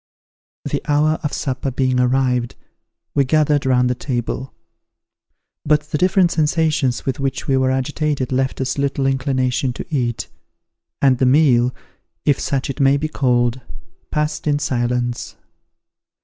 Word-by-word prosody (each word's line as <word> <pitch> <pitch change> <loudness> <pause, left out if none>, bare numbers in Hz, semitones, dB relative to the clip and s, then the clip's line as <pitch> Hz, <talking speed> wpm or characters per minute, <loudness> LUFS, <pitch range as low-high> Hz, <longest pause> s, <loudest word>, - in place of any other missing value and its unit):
The - - -2
hour 150 +2 +2
of 150 - -2
supper 135 0 -2
being 130 0 0
arrived, 125 -1 +1 0.6
we 140 - +3
gathered 145 0 +2
round 125 -1 +3
the 125 - +1
table; 125 +1 -4 1.1
but 150 0 +3
the - - +1
different 185 0 +3
sensations 155 -5 +1
with 130 0 -2
which 135 -1 -2
we 135 - +2
were 130 0 +2
agitated 135 0 -1
left 130 0 0
us 130 +2 -2
little 140 -1 0
inclination 130 -1 0
to - - -7
eat, 120 -4 -1 0.8
and 130 -3 +4
the 130 - +3
meal, 125 -3 +4 0.5
if 145 - +3
such 135 -1 -1
it 135 - -5
may 135 0 +4
be 155 +2 -2
called, 125 -3 +1 0.5
passed 150 0 -2
in 145 -1 +2
silence. 120 -3 -2
135 Hz, 140 wpm, -19 LUFS, 125-145 Hz, 1.1 s, and